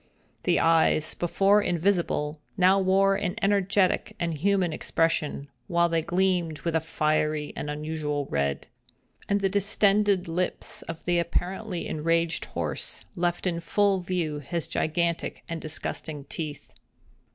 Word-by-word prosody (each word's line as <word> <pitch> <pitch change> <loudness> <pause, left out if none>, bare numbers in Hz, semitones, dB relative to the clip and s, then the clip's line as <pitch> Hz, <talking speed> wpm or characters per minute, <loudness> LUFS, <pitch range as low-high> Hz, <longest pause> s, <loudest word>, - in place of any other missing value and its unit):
The 175 - +3
eyes, 160 -1 +3
before 195 +4 +3
invisible, 170 -5 0 0.2
now 190 +1 +5
wore 195 +1 +4
an 180 -1 -2
energetic 195 -2 +2
and 170 -1 -1
human 180 +1 +1
expression, 155 -4 0 0.2
while 170 0 +2
they 165 -1 +1
gleamed 175 -2 0
with 170 -1 -1
a - - +4
fiery 155 -1 0
and 150 - -4
unusual 150 -1 -2
red; 70 - -1 0.6
and 200 0 +2
the 195 - +3
distended 200 -1 +2
lips 180 +2 -2
of 165 -1 -8
the 175 -1 +2
apparently 180 +3 -2
enraged 165 +1 0
horse - - -4
left 175 0 -1
in 170 -2 0
full 195 +3 +2
view 175 -4 -2
his 165 +4 -4
gigantic 170 +1 -1
and 165 -1 -4
disgusting 155 -1 -5
teeth. 150 +1 -6
170 Hz, 130 wpm, -27 LUFS, 155-190 Hz, 0.6 s, now